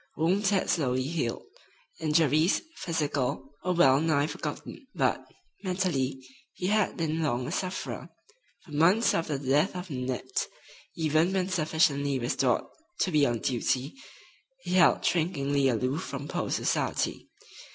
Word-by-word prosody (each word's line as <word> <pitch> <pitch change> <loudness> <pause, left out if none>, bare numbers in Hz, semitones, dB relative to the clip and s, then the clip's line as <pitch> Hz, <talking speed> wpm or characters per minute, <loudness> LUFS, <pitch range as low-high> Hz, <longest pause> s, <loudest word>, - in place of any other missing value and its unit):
Wounds 185 +5 +2
had 195 -2 +1
slowly 130 -5 +1
healed. 140 -5 -2 0.5
Injuries, 155 +2 +3
physical, 145 -4 -2
were 180 - +1
well 135 -6 +5
nigh 155 -3 +2
forgotten; 265 - -6
but, - - +1 0.4
mentally, 145 -9 -1 0.3
he 180 - -5
had 210 +1 +1
been 160 -1 -1
long 125 -5 0
a - - -4
sufferer. 185 +1 -4 0.6
For 165 - -15
months 175 +10 +4
after 160 -3 -1
the 135 -1 -6
death 150 +8 +3
of 180 -1 -6
Nanette, 125 -1 -2 0.5
even 160 +2 +2
when 190 -1 0
sufficiently 155 -5 +1
restored 125 0 +1 0.4
to 185 - +1
be 150 -3 +4
on 120 -2 -1
duty, 130 +2 0 0.7
he 175 - -5
held 185 -2 +4
shrinkingly 145 -5 +1
aloof 130 +4 0
from 140 +1 -6
post - - -2
society. - - -1
155 Hz, 135 wpm, -28 LUFS, 135-175 Hz, 0.7 s, well